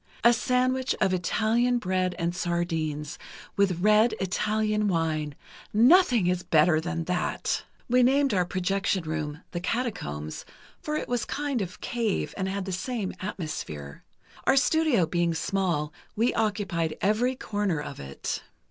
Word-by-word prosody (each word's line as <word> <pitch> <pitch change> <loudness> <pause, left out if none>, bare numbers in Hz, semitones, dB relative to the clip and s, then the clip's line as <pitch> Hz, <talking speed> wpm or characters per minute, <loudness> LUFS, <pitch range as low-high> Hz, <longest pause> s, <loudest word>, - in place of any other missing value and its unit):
A 235 +1 +7
sandwich 255 +2 +1
of 190 -2 +2
Italian 225 +7 +2
bread 185 -4 0
and 170 +1 -1
sardines, 165 -3 -2 0.4
with 190 -4 +2
red 215 +2 +5
Italian 210 +2 0
wine—nothing 190 - +2
is 180 0 +1
better 155 -1 +4
than 165 0 -3
that! 180 +2 -1 0.3
We 250 +1 +4
named 270 0 +3
our 185 -2 +3
projection 190 +1 0
room 155 0 -4
'The 175 - -3
Catacombs,' 175 - -3 0.4
for 300 - -3
it - - -2
was 245 -1 0
a - - -7
kind 280 -4 -1
of 185 -2 -6
cave, 230 -4 -1
and 190 -1 -2
had 195 0 -3
the 190 - -4
same 200 +2 -3
atmosphere. 150 - -5 0.4
Our 270 - +5
studio 295 - +3
being 170 0 0
small, 165 -3 -1 0.2
we 230 +3 +2
occupied 200 -8 -1
every 235 +6 +2
corner 205 -9 -1
of 145 -1 -7
it." 70 0 -4
190 Hz, 140 wpm, -27 LUFS, 170-230 Hz, 0.4 s, A